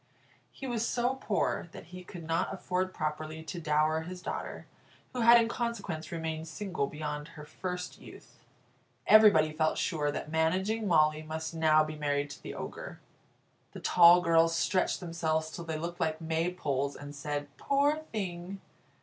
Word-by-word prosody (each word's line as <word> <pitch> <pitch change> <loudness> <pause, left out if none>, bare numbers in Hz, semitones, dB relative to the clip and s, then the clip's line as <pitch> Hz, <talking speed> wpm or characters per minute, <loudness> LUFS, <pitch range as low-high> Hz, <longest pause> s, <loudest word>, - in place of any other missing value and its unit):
He 270 - -9
was 240 -3 -1
so 245 +2 +1
poor 215 -8 -1
that - - -9
he 180 0 -8
could 175 -1 -9
not 165 +3 0
afford 185 -1 -2
properly 155 0 -4
to 170 +2 -6
dower 155 +1 +2
his 180 +3 -7
daughter, - - -5 0.5
who 250 - -2
had 235 +1 +8
in 230 - +2
consequence 210 -10 -4
remained 160 -1 -4
single 175 -2 -3
beyond 150 0 -5
her 155 -3 -11
first 180 +3 -5
youth. - - -15 0.6
Everybody 200 -8 +7
felt 155 0 +1
sure 150 -4 0
that 150 - -5
Managing 190 +7 +1
Molly 155 -3 +4
must 160 +1 -5
now 155 -1 +4
be 155 0 -5
married 145 -1 -1
to - - -10
the - - -7
Ogre. - - -7 0.7
The - - -7
tall 175 0 +7
girls 165 -1 +4
stretched 185 +3 +1
themselves 160 -2 -1
till 170 +1 -7
they 160 -1 -3
looked 170 +2 -5
like 160 -1 0
maypoles, 160 -4 -1
and 145 0 -9
said, 145 0 -4
"Poor 285 +2 +2
thing!" 190 -2 -4
165 Hz, 160 wpm, -30 LUFS, 155-185 Hz, 0.7 s, had